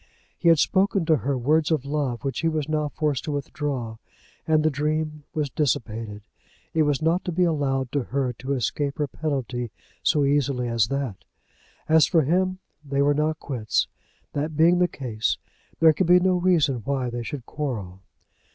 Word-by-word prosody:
He 170 Hz, -, -2 dB
had 165 Hz, -, +6 dB
spoken 190 Hz, +2 st, +2 dB
to 160 Hz, -1 st, +4 dB
her 140 Hz, -1 st, -1 dB
words 150 Hz, +5 st, +2 dB
of 155 Hz, -5 st, 0 dB
love 140 Hz, -4 st, -2 dB
which 135 Hz, -1 st, -2 dB
he 165 Hz, -, +1 dB
was 155 Hz, -3 st, -1 dB
now 155 Hz, -1 st, 0 dB
forced 145 Hz, -1 st, -1 dB
to 155 Hz, -, -2 dB
withdraw, 140 Hz, -5 st, -3 dB, 0.5 s
and 155 Hz, -1 st, +3 dB
the 155 Hz, -, +3 dB
dream 150 Hz, +1 st, -2 dB
was 150 Hz, -3 st, -1 dB
dissipated. 110 Hz, -7 st, -2 dB, 0.5 s
It 160 Hz, -, +2 dB
was 145 Hz, 0 st, +1 dB
not 165 Hz, +3 st, +2 dB
to 180 Hz, -, -1 dB
be 180 Hz, +2 st, +2 dB
allowed 135 Hz, -6 st, 0 dB
to 140 Hz, -4 st, -1 dB
her 130 Hz, -2 st, -1 dB
to 130 Hz, +4 st, -4 dB
escape 140 Hz, +2 st, -1 dB
her 150 Hz, -, +1 dB
penalty 130 Hz, -5 st, -3 dB, 0.3 s
so 145 Hz, -2 st, +3 dB
easily 140 Hz, -3 st, +1 dB
as 115 Hz, -2 st, +2 dB
that! 135 Hz, -6 st, -2 dB, 0.7 s
As 160 Hz, -1 st, +5 dB
for 165 Hz, -4 st, +3 dB
him, 185 Hz, +5 st, +1 dB, 0.3 s
they 140 Hz, -1 st, 0 dB
were 145 Hz, +1 st, +4 dB
now 150 Hz, +2 st, +1 dB
quits. 125 Hz, -9 st, -1 dB, 0.5 s
That 150 Hz, +1 st, -2 dB
being 170 Hz, +2 st, +5 dB
the 180 Hz, -, +4 dB
case, 115 Hz, -9 st, -2 dB, 0.4 s
there 160 Hz, -1 st, +7 dB
could 185 Hz, +2 st, 0 dB
be 180 Hz, +1 st, +7 dB
no 185 Hz, 0 st, +2 dB
reason 170 Hz, -7 st, +3 dB
why 125 Hz, +2 st, -2 dB
they 120 Hz, 0 st, -3 dB
should 125 Hz, +1 st, -6 dB
quarrel. 110 Hz, -12 st, -4 dB
145 Hz, 180 wpm, -25 LUFS, 130-155 Hz, 0.7 s, there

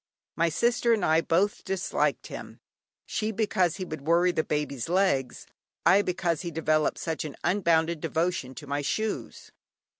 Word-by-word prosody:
My 170 Hz, +1 st, +2 dB
sister 235 Hz, +6 st, +2 dB
and 210 Hz, -5 st, +1 dB
I 160 Hz, +1 st, +4 dB
both 190 Hz, +6 st, +1 dB
disliked 190 Hz, -1 st, -1 dB
him, -, -, -9 dB, 0.5 s
she 215 Hz, 0 st, -2 dB
because 190 Hz, -6 st, +1 dB
he 185 Hz, -, -5 dB
would 155 Hz, -4 st, -6 dB
worry 170 Hz, +4 st, +3 dB
the 160 Hz, -, 0 dB
Baby's 150 Hz, -3 st, -2 dB
legs, 175 Hz, -9 st, +1 dB, 0.4 s
I 200 Hz, -, +6 dB
because 175 Hz, -4 st, -1 dB
he 175 Hz, -, -4 dB
developed 155 Hz, -1 st, +1 dB
such 160 Hz, -1 st, -3 dB
an 150 Hz, -3 st, -6 dB
unbounded 170 Hz, -4 st, +2 dB
devotion 160 Hz, -6 st, -1 dB
to 150 Hz, -, -9 dB
my 145 Hz, +1 st, -2 dB
shoes. 215 Hz, +9 st, -3 dB
170 Hz, 155 wpm, -27 LUFS, 155-190 Hz, 0.5 s, I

